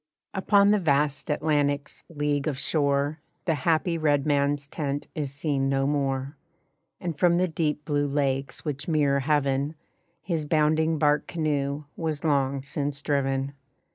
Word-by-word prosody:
Upon 200 +1 +4
the 210 - +4
vast 145 -3 +1
Atlantic's 145 -1 0
leagues 145 -2 -1
of 140 - -4
shore 145 +1 +1 0.3
The 165 - +2
happy 165 +3 +1
red 145 -3 +2
man's 145 -1 +1
tent 145 0 -3
is 145 -3 -3
seen 140 -1 -1
no 135 0 +1
more; 140 0 -1 0.6
And 170 -3 -3
from 170 +2 +3
the 185 +1 +2
deep 155 -2 -2
blue 145 -1 +1
lakes 140 -1 -1
which 145 -1 -3
mirror 145 -4 +2
heaven 140 +1 +1 0.5
His 165 -4 -1
bounding 155 +1 +2
bark 150 -1 +2
canoe 145 -3 -1
was 155 -3 -3
long 140 -3 +1
since 140 +1 -3
driven. 135 -1 0
145 Hz, 140 wpm, -26 LUFS, 140-155 Hz, 0.6 s, Upon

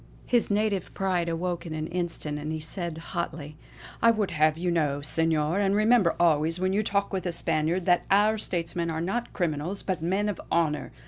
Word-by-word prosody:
'" - - -24
His 240 -2 +2
native 205 -3 0
pride 180 -3 0
awoke 175 +1 -2
in 160 -2 -6
an 155 0 -3
instant 165 -3 -3
for 150 - -7
he 155 0 -3
said 170 +1 -4 0.2
hotly: 160 -4 -4 0.5
"I 230 - +6
would 215 -3 +1
have 155 -1 +2
you 175 +1 -1
know, 145 -4 0
Senor, 160 +2 +1
and 200 -1 +2
remember 215 -4 +4
always 165 0 +3
when 185 +1 0
you 205 - +2
talk 200 -1 0
with 190 -1 -2
a - - 0
Spaniard, 170 +1 0
that 175 -1 +2
our 210 +2 +4
statesmen 170 -3 -2
are 160 0 -2
not 195 +8 -2
criminals, 170 +2 -2
but 185 -4 -2
men 190 +5 0
of 205 -4 -3
honour." 160 -3 0
175 Hz, 200 wpm, -27 LUFS, 160-195 Hz, 0.5 s, I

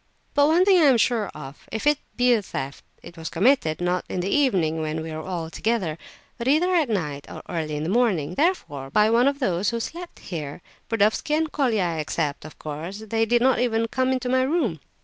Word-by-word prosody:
But 290 0 +4
one 340 +4 +4
thing 385 -2 +6
I - - +6
am 260 -3 +5
sure 230 -2 +1
of, 140 -2 -10
if 220 - -4
it 295 -1 +4 0.2
be 245 0 +4
a 225 - +2
theft, 140 -7 -6 0.2
it 170 - -11
was 160 0 -5
committed, 180 - +2
not 180 0 0
in - - -3
the 190 - -2
evening 180 - +2
when 155 +1 -3
we 160 - -6
were 155 0 -5
all 165 -2 -5
together, 190 -9 -1 0.4
but 235 - -3
either 330 +7 +3
at 320 -7 +2
night 150 -9 -2
or - - -8
early 155 -3 -3
in 150 - -3
the - - -2
morning; 190 -9 +1
therefore, 170 - -1
by 210 +8 +3
one 240 +3 +4
of 280 0 +1
those 195 -7 0
who 235 - -2
slept 340 +8 -7
here. 155 -2 -7 0.3
Burdovsky 225 +8 +2
and 315 0 0
Colia 240 -9 +1
I 170 -2 -2
except, 150 -1 -2
of 155 - -11
course. 165 +8 -6
They 225 0 +2
did 240 +1 +3
not 260 -3 +3
even 230 -2 +1
come 260 +1 0
into 255 -1 -1
my 260 +1 +2
room." 260 - 0
215 Hz, 225 wpm, -24 LUFS, 160-260 Hz, 0.4 s, thing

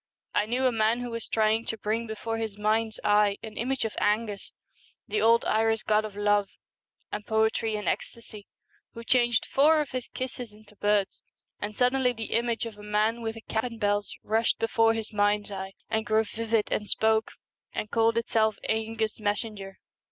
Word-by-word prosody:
I 210 - +1
knew 250 +3 0
a 255 - +4
man 225 +1 +2
who 245 -1 -4
was 230 0 -3
trying 220 0 +2
to 225 - -3
bring 220 +2 -2
before 225 +1 -4
his 220 -3 -4
mind's 215 +1 0
eye 205 -1 +4
an 220 -1 -8
image 255 +1 -1
of 220 - -3
/Engus, 210 -1 0 0.6
the 210 0 0
old 230 +1 +5
Irish 225 0 +2
god 215 0 +2
of 210 -2 -8
love 205 -1 +2 0.6
and 210 - -4
poetry 220 0 +1
and 210 - -4
ecstasy, 215 -3 -4 0.5
who 230 - -7
changed 240 -1 +2
four 305 +3 +4
of 300 - -2
his 255 -2 -4
kisses 250 -3 -6
into 210 0 -18
birds, 205 -1 +1 0.4
and 205 0 -5
suddenly 250 0 +3
the 225 -2 -6
image 235 0 0
of 220 -2 -8
a - - -9
man 210 +3 0
with 225 0 -3
a 225 - -9
cap 220 0 -2
and 230 -2 -6
bells 205 -2 0
rushed 225 +2 +1
before 225 0 +3
his 220 -1 -4
mind's 205 0 +1
eye, 190 0 -5
and 220 +1 -1
grew 220 0 +3
vivid 225 0 -1
and 210 - -1
spoke 220 0 +2 0.4
and 210 - -4
called 230 0 +3
itself 220 -2 +2
' - - -7
^Engus' 220 0 -1
messenger.' 205 -2 -3
220 Hz, 190 wpm, -27 LUFS, 210-230 Hz, 0.6 s, old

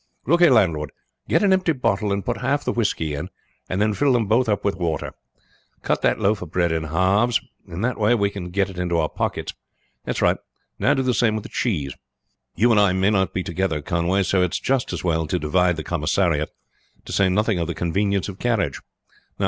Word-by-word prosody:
Look 170 +6 +3
here, 175 - +7
landlord, 85 - +2 0.4
get - - +3
an 195 -2 +4
empty 185 -3 +2
bottle 105 -6 0
and 100 0 -2
put - - -1
half 140 +3 0
the - - +1
whisky 80 -9 -1
in, 75 +6 -5 0.4
and 95 - -1
then 105 0 +2
fill 140 +5 +2
them 120 -3 +2
both 115 +4 +2
up 105 - 0
with 100 - +1
water. 85 -3 -2 0.7
Cut - - 0
that - - +2
loaf 105 +1 +1
of 90 - -7
bread 85 0 +1
in 80 -1 -1
halves; 95 +9 +2 0.3
in 85 - -6
that 125 0 -1
way 110 +3 +3
we 100 -3 +1
can 90 -3 -6
get 100 +2 0
it 95 -2 -8
in 90 -1 -2
our 85 -2 +2
pockets. - - -3 0.5
That's - - -3
right; - - +3 0.4
now - - +3
do 135 - 0
the 130 -1 +1
same 115 -3 +2
with 110 - -4
the - - -9
cheese. 75 - -2 0.6
You 120 +3 +3
and 110 - +4
I 100 -3 +4
may 95 +2 +2
not 95 -2 +1
be 90 - -2
together, 85 -3 -1
Conway, 85 +5 +1
so 95 0 +1
it's 90 -2 0
just 135 -2 0
as - - -4
well 80 -3 0
to - - 0
divide 90 +4 +1
the 80 - -4
commissariat; 80 -1 0 0.6
to - - -8
say 100 -1 +3
nothing 105 0 +1
of 85 - -1
the 85 - -4
convenience 100 +3 0
of 100 -2 -8
carriage. 110 - -1
95 Hz, 220 wpm, -22 LUFS, 85-110 Hz, 0.7 s, here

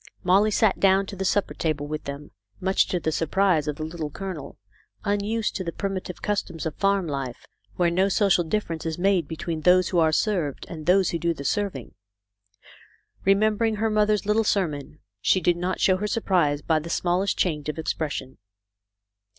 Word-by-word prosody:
Molly 195 +4 +4
sat 215 -1 +2
down 195 0 +4
to 200 - -8
the 190 - -3
supper 195 +1 +1
table 155 -3 -2
with 155 +1 -5
them, 140 +1 -7 0.3
much 190 +1 +2
to 180 - -1
the 160 - -1
surprise 165 0 +1
of 150 - -1
the 155 - -5
Little 160 -1 -5
Colonel, 160 -4 -7 0.5
unused 210 +2 -1
to 190 - -3
the 170 - -3
primitive 190 -1 -5
customs 190 -6 -2
of 160 - -2
farm 195 -1 +2
life, 135 -5 -5 0.3
where 175 -1 +2
no 190 +3 +2
social 195 -3 +3
difference 165 -2 -2
is 160 -1 -3
made 185 -3 +2
between 160 +1 -4
those 180 +2 +4
who 175 - +1
are 160 -1 +4
served 160 -4 0
and 160 -3 -8
those 185 0 +4
who 170 - -2
do 170 0 0
the 140 - -8
serving. 200 - -2 1.3
Remembering 215 +3 +3
her 220 +1 0
mother's 210 -1 +2
little 210 +2 +2
sermon, 155 -8 -1 0.2
she 185 - +3
did 175 0 +2
not 180 +2 -2
show 185 -1 +3
her 210 +2 -2
surprise 175 -9 +1
by 160 -1 +2
the 160 +2 -8
small 175 +1 +1
est 200 - -1
change 150 -4 -1
of 150 - -4
expression. 145 -5 -3
180 Hz, 185 wpm, -25 LUFS, 155-200 Hz, 1.3 s, Molly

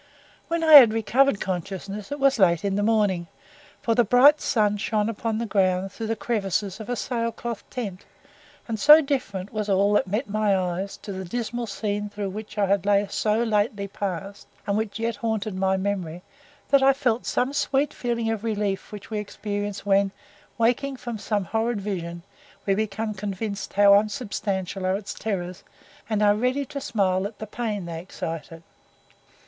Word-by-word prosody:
When 335 0 -1
I 310 -2 +11
recovered 230 +1 +3
consciousness 195 - -5
it 285 - -3
was 275 -3 +3
late 170 -2 +3
in 200 - 0
the 205 - +1
morning, 205 -5 +1 0.6
for 230 - +2
the 240 +1 +4
bright 265 +7 +6
sun 210 -2 +1
shone 215 0 0
upon 225 0 -2
the 235 - -2
ground 190 -2 +1
through 225 +3 -5
the 225 - 0
crevices 200 -3 -2
of 220 - -8
a 245 - 0
sail 230 -1 -2
cloth 230 -1 -6
tent, 200 -7 -5 0.6
and 225 -2 -3
so 300 +6 +9
different 220 -9 -3
was 215 -1 -2
all 200 +1 +3
that 205 - +2
met 215 +8 -1
my 210 -1 +1
eyes 185 +2 -3
to 205 - -6
the 190 0 -5
dismal 235 +4 -3
scene 205 0 -3
through 205 -1 -4
which 215 +2 -8
I 205 - +3
had 200 +1 +2
so 215 +2 +1
lately 210 -2 0
passed, 195 0 -5 0.2
and 200 - 0
which 215 -1 -2
yet 230 +1 -2
haunted 220 -2 -2
my 190 0 +1
memory, 185 -3 -3 0.5
that 275 -1 +5
I 270 0 +6
felt 250 -3 0
that 255 +3 0
sweet 280 +1 +1
feeling 235 -2 -1
of 220 -1 -3
relief 205 -4 -2
which 210 +1 -10
we 215 - -1
experience 205 -1 -4
when, 200 0 +3 0.5
waking 245 +4 +1
from 240 -3 -6
some 205 -2 -1
horrid 225 +4 -1
vision, 170 -4 -5 0.4
we 195 - +2
become 215 +1 -2
convinced 200 +1 -5
how 200 0 +6
unsubstantial 200 -4 -1
are 185 - +2
its 200 -1 -7
terrors, 185 -4 -4 0.5
and 215 -1 +1
are 205 0 +5
ready 250 +6 0
to 280 +2 -6
smile 190 -5 0
at 210 - -14
the 215 - -6
pain 210 -3 -3
they 165 -1 -5
excited. 165 -2 -7
210 Hz, 175 wpm, -25 LUFS, 195-230 Hz, 0.6 s, I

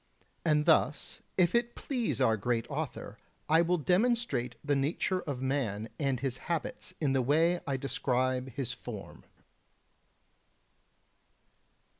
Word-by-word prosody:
And 150 -2 +3
thus 155 -2 +2 0.2
if 180 -2 +4
it 235 0 +1
please 245 - -2
our 115 -4 +4
great 115 +2 -1
author - - -4 0.3
I 160 +2 +5
will 175 +1 +2
demonstrate 180 - +1
the 145 -1 +2
nature 160 +6 0
of 135 -5 -4
man 115 -6 -1
and 135 -4 0
his 130 -1 -2
habits 170 +2 -3
in 145 -4 +1
the 135 - +3
way 165 +7 +3
I 135 -1 0
describe 130 -1 0
his 125 -2 -2
form. 110 -6 -9
140 Hz, 125 wpm, -31 LUFS, 125-170 Hz, 0.3 s, I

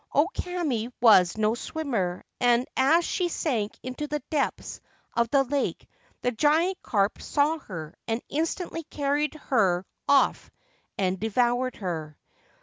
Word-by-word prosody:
O 290 +4 +5
Kame 305 - -2
was 210 -6 +6
no 215 0 +2
swimmer, 235 - -2 0.2
and 245 0 +3
as 320 +6 +4
she 360 - 0
sank 235 -11 -2
into 255 +4 -4
the 295 -1 -3
depths 295 -3 -2 0.3
of 235 -1 +2
the 275 +1 +4
lake 275 +1 -2 0.4
the 245 - +2
giant 315 +10 +2
carp 200 -2 0
saw 305 +2 +1
her, 160 - -8
and 225 0 0
instantly 330 +2 -2
carried 290 +2 -1
her 195 -11 +1 0.2
off 280 -1 +3 0.5
and 190 -1 0
devoured 245 +4 +1
her. 160 -6 -5
250 Hz, 135 wpm, -26 LUFS, 215-300 Hz, 0.5 s, was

